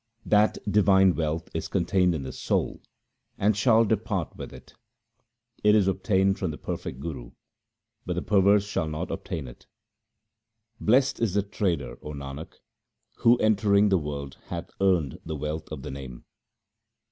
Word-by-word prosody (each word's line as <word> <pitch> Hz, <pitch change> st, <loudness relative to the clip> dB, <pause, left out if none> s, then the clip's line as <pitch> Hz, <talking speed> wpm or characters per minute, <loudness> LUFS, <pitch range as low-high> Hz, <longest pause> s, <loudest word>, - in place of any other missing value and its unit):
That 105 Hz, 0 st, +3 dB
divine 95 Hz, -2 st, +5 dB
wealth 80 Hz, 0 st, -2 dB
is -, -, -3 dB
contained 90 Hz, 0 st, +1 dB
in 70 Hz, -, -4 dB
the 65 Hz, -, -5 dB
soul -, -, -2 dB, 0.6 s
and 105 Hz, +1 st, +2 dB
shall 115 Hz, +1 st, +4 dB
depart 105 Hz, -5 st, -1 dB
with -, -, -8 dB
it. -, -, -14 dB, 0.9 s
It 105 Hz, 0 st, +6 dB
is 100 Hz, -3 st, +4 dB
obtained 95 Hz, 0 st, +1 dB
from 90 Hz, -, -1 dB
the 75 Hz, -, -6 dB
perfect 65 Hz, -, -5 dB
Guru, 70 Hz, -6 st, -7 dB, 0.7 s
but 90 Hz, -, 0 dB
the 90 Hz, -, -3 dB
perverse 100 Hz, 0 st, +4 dB
shall 95 Hz, -5 st, -2 dB
not 80 Hz, +4 st, -4 dB
obtain 80 Hz, -6 st, -5 dB
it. -, -, -14 dB, 1.1 s
Blest 130 Hz, +5 st, +3 dB
is 110 Hz, -5 st, 0 dB
the 100 Hz, -, +2 dB
trader, 90 Hz, -, -2 dB
O 75 Hz, -, -7 dB
Nanak, 70 Hz, +2 st, -7 dB, 0.6 s
who 120 Hz, +1 st, +5 dB
entering 105 Hz, -2 st, +3 dB
the 95 Hz, -2 st, +3 dB
world 70 Hz, -3 st, -6 dB
hath -, -, -6 dB
earned 90 Hz, -9 st, +2 dB
the 80 Hz, -, -5 dB
wealth 75 Hz, +2 st, -5 dB
of 70 Hz, -4 st, -6 dB
the -, -, -6 dB
Name. 65 Hz, -3 st, -9 dB
95 Hz, 155 wpm, -26 LUFS, 75-105 Hz, 1.1 s, It